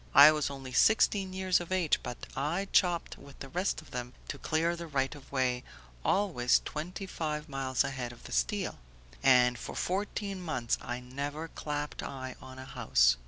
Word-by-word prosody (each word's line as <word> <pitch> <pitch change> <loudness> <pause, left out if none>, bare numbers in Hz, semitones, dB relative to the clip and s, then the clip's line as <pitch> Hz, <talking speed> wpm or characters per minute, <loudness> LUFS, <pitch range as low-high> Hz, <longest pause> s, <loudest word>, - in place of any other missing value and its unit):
I 145 +2 +11
was 150 -2 0
only 135 -2 -7
sixteen 195 - +4
years 185 -1 +2
of 175 0 -7
age 180 -5 +2
but 120 - -5 0.2
I 165 +8 -1
chopped 175 -3 +2
with 140 0 -14
the 135 - -8
rest 180 0 -1
of - - -18
them 125 0 -5 0.2
to 140 - -4
clear 165 +4 +1
the 170 0 -7
right 135 -2 0
of 145 -2 -14
way, 125 -2 +1 0.4
always 170 -12 +3
twenty 180 +6 -4
five 155 -4 -3
miles 135 -3 0
ahead 130 -3 -3
of 120 - -14
the - - -10
steel, 200 - 0 0.4
and 125 -2 +5
for - - -6
fourteen 195 0 -2
months 130 -9 -1
I 120 +1 -4
never 145 +5 -5
clapped 150 -1 -4
eye 130 -1 -5
on 130 0 -10
a 130 - -8
house. - - +3
145 Hz, 180 wpm, -31 LUFS, 130-175 Hz, 0.4 s, I